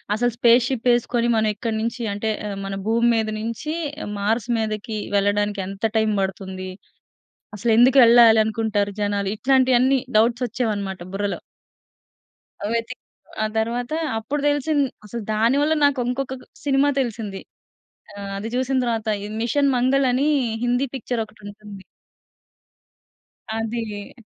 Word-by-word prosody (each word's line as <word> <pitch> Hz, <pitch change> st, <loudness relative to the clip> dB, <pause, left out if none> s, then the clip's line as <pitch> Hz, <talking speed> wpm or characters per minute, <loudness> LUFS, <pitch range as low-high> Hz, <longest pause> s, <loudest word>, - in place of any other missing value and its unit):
అసలు 240 Hz, +2 st, 0 dB
స్పేస్‌షిప్ 240 Hz, +1 st, +3 dB
వేసుకొని, 240 Hz, 0 st, +1 dB
మనం 220 Hz, -1 st, +2 dB
ఎక్కడి 225 Hz, 0 st, -3 dB
నుంచి 230 Hz, +2 st, -3 dB
అంటే 215 Hz, +2 st, -2 dB, 0.2 s
ఆహ్, 200 Hz, -, -5 dB
మన 195 Hz, 0 st, -4 dB
భూమి 235 Hz, +1 st, +3 dB
మీద 220 Hz, -1 st, 0 dB
నుంచి, 230 Hz, +8 st, -4 dB, 0.5 s
మార్స్ 220 Hz, +3 st, 0 dB
మీదకి 215 Hz, 0 st, -3 dB, 0.2 s
వెళ్ళడానికి 205 Hz, 0 st, +1 dB
ఎంత 195 Hz, +3 st, -4 dB
టైమ్ 220 Hz, -1 st, +2 dB
పడుతుంది? 190 Hz, 0 st, -4 dB, 0.9 s
అసలు 230 Hz, +3 st, 0 dB
ఎందుకు 255 Hz, +3 st, +6 dB
వెళ్ళాలి 230 Hz, -1 st, +7 dB
అనుకుంటారు 210 Hz, -2 st, -1 dB
జనాలు? 205 Hz, -1 st, 0 dB
ఇట్లాంటివన్నీ 260 Hz, 0 st, +3 dB, 0.2 s
డౌట్స్ 235 Hz, +3 st, +2 dB
వచ్చేవన్నమాట 205 Hz, -6 st, -3 dB
బుర్రలో. 200 Hz, 0 st, -2 dB, 1.4 s
వెతికి, 230 Hz, +2 st, -3 dB, 0.4 s
ఆ -, -, +2 dB
తరువాత 235 Hz, +2 st, -2 dB, 0.3 s
అప్పుడు 285 Hz, +7 st, -3 dB
తెలిసింది. 290 Hz, -1 st, +1 dB, 0.2 s
అసలు 235 Hz, +1 st, -6 dB
దాని 230 Hz, +5 st, +2 dB
వల్ల 315 Hz, +1 st, +2 dB
నాకు 285 Hz, -2 st, +3 dB
ఇంకొక 265 Hz, +1 st, -3 dB, 0.3 s
సినిమా 280 Hz, 0 st, +3 dB
తెలిసింది. 220 Hz, -6 st, -4 dB, 0.7 s
ఆ! -, -, -12 dB, 0.2 s
అది 215 Hz, +3 st, -5 dB
చూసిన 260 Hz, +1 st, 0 dB
తరువాత 225 Hz, -2 st, -2 dB, 0.3 s
'మిషన్ 275 Hz, +3 st, +2 dB
మంగల్' 260 Hz, +2 st, +2 dB
అని, 275 Hz, +4 st, +1 dB, 0.4 s
హిందీ 245 Hz, +3 st, +1 dB
పిక్చర్ 245 Hz, -2 st, -2 dB
ఒకటుంటుంది. 210 Hz, -2 st, -12 dB, 1.7 s
అది. 225 Hz, -2 st, -4 dB
230 Hz, 125 wpm, -22 LUFS, 210-250 Hz, 1.7 s, వెళ్ళాలి